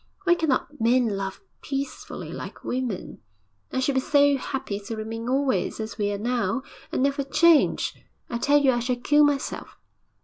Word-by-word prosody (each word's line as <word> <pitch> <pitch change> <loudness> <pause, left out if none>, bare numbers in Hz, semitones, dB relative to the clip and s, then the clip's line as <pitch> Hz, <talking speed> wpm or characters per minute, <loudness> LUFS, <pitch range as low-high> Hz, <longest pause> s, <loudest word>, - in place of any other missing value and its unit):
Why 350 -2 +5
cannot 295 -4 -1
men 240 +1 +3
love 195 -1 -4 0.2
peacefully 275 0 -5
like - - -8
women? 250 -6 -3 0.5
I - - -1
should 270 +2 +1
be 265 - +2
so 285 0 +4
happy 260 -6 -4
to 225 +3 -6
remain 225 +2 -5
always 270 -2 0
as 220 0 -5
we 205 0 +1
are 200 - -2
now, 235 +2 -1 0.3
and - - 0
never 280 0 +1
change. 320 +3 +4 0.3
I 235 - -3
tell 285 +4 +4
you 275 -2 +4
I 240 - 0
shall 250 +1 0
kill 295 +5 +4
myself.' 290 -2 -1
255 Hz, 170 wpm, -25 LUFS, 225-280 Hz, 0.5 s, Why